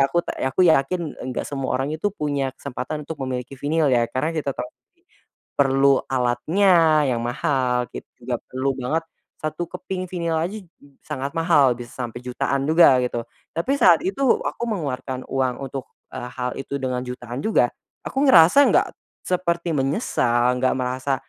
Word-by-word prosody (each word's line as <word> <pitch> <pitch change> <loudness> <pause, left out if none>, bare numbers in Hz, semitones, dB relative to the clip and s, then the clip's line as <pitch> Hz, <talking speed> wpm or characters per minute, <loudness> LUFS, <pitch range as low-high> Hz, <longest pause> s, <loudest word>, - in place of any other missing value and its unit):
aku 175 - 0
ta - - -4
ya, - - +1
aku - - +4
yakin 160 +1 +2
enggak 125 -1 -4
semua 135 -2 -2
orang 135 +3 -2
itu 160 +6 -1
punya 145 -5 -1
kesempatan 140 +3 -5
untuk 160 +1 -7
memiliki 130 0 -4
vinyl 150 +1 +1
ya, 120 -2 +3
karena 150 +5 -1
kita 145 -4 -2
tahui, 125 - -5 0.9
perlu 135 0 +4
alatnya 155 +6 +3
yang 120 -2 0
mahal, 125 -1 0
gitu. 60 - -7 0.2
Juga - - -1
perlu 130 +2 -1
banget, 150 +6 -1 0.4
1 155 +2 -3
keping 185 0 -5
vinyl 170 -3 -1
aja, 185 +7 -3
j 180 - -22 0.4
sangat 140 -2 -4
mahal, 165 -6 +4
bisa 120 -1 -8
sampai 120 -2 -5
jutaan 135 +2 -1
juga, 155 -5 +6
gitu. 120 -1 -3 0.3
Tapi 170 +11 0
saat 170 -3 +7
itu, 195 +8 -2 0.2
aku - - -4
mengeluarkan 130 - -3
uang 130 -2 0
untuk, 135 -1 -6 0.3
eee, 125 - -5
hal 125 -1 -2
itu 135 +1 -4
dengan 125 -1 -1
jutaan 125 0 -6
juga, 220 - +2 0.4
aku 270 - -1
ngerasa 175 - +7
enggak - - +3 0.3
seperti 170 -2 0
menyesal, 125 - +1
enggak 130 +1 +2
merasa 130 +2 -1
140 Hz, 165 wpm, -23 LUFS, 125-165 Hz, 0.9 s, saat